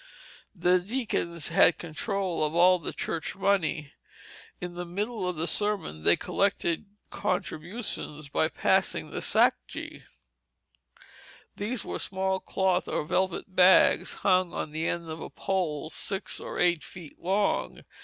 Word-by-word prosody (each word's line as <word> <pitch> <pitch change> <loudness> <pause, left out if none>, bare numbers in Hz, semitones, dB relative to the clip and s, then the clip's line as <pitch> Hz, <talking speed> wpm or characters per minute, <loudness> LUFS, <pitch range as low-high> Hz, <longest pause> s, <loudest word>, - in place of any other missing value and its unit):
The 180 0 +3
deacons 180 - -2
had 165 - +5
control 180 +1 -2
of 155 +1 -1
all 180 +1 +6
the - - -4
church 165 -2 -4
money. 190 -7 0 0.7
In 180 0 -5
the 175 0 -5
middle 200 +2 -3
of 180 - -3
the 160 +1 -1
sermon 205 - 0
they 85 - +5
collected 195 -2 0 0.2
contributions 180 -4 -3
by 150 +3 +1
passing 160 - +1
sacjes. - - 0 1.5
These 215 +2 -3
were - - -4
small 190 0 -1
cloth 190 -2 0
or - - -1
velvet 185 +2 -1
bags 185 +1 +5
hung 185 -2 +3
on 150 - -3
the 160 +2 -2
end 170 -1 -2
of 160 0 -6
a - - -6
pole 165 -5 -2
six 195 0 -2
or - - -6
eight 175 -3 +2
feet 170 -5 -11
long. 195 +3 0
180 Hz, 135 wpm, -28 LUFS, 165-195 Hz, 1.5 s, all